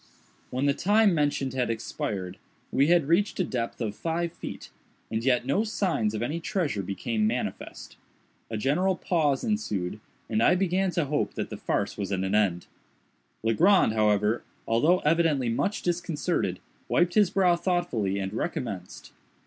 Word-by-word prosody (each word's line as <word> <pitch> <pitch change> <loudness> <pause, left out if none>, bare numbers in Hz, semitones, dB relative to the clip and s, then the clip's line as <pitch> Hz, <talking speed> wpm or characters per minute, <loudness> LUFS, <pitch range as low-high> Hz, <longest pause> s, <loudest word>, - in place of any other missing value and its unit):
When 130 +2 -1
the 140 - +3
time 205 +4 +3
mentioned 145 -4 0
had 125 -2 0
expired, 100 -4 -4 0.3
we 140 - +3
had 170 -4 +4
reached 185 +6 +2
a - - +3
depth 120 -7 -3
of 110 -4 -2
five 170 +1 -2
feet, - - -8 0.4
and 110 0 -1
yet 125 -1 +2
no 140 +11 +1
signs 180 - 0
of 110 - -2
any 150 +7 -2
treasure 160 - -1
became 105 +3 -1
manifest. 120 +3 -4 0.5
A 110 - -3
general 165 - +1
pause 155 -7 0
ensued, 110 - -2 0.3
and 110 - 0
I 180 - +5
began 190 +1 +1
to 170 - +1
hope 145 +1 -1
that - - -4
the - - -4
farce - - -2
was 100 -1 -3
at 95 -1 0
an 95 +1 -2
end. 100 -5 +2 0.8
Legrand, 160 - +4
however, 105 +1 +2 0.3
although 155 +11 +3
evidently 150 -5 +2
much 155 - -1
disconcerted, 170 - -1 0.3
wiped 175 0 +2
his 210 -4 +4
brow 180 -2 +3
thoughtfully 170 - -1
and 95 0 -3
recommenced. 100 -5 -5
140 Hz, 155 wpm, -27 LUFS, 110-175 Hz, 0.8 s, I